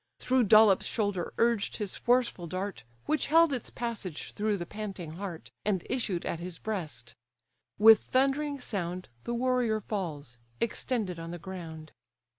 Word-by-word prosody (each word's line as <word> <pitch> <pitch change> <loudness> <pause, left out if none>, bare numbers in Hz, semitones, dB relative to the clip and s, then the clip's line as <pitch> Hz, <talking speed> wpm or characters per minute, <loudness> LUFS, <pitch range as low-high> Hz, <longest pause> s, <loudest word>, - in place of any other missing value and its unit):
Through 255 -2 +2
Dolops' 215 -2 +6
shoulder 205 -5 -1
urged 230 -3 +2
his 205 -3 -3
forceful 240 -8 +1
dart, 185 - -4 0.2
Which 310 - +1
held 330 0 +5
its 250 - -3
passage 220 -9 -5
through 210 0 0
the 175 - -4
panting 195 -4 -6
heart, 185 -4 -6
And 195 -4 0
issued 200 -9 -1
at 165 - -2
his 175 -1 -6
breast. 160 - -4 0.6
With 220 +1 +8
thundering 275 +2 +1
sound 180 -6 -3 0.2
The 235 - -1
warrior 245 -3 +1
falls, 155 - -5 0.2
extended 220 -6 -1
on 165 0 -6
the 175 - -5
ground. 165 -3 -8
205 Hz, 145 wpm, -30 LUFS, 175-235 Hz, 0.6 s, With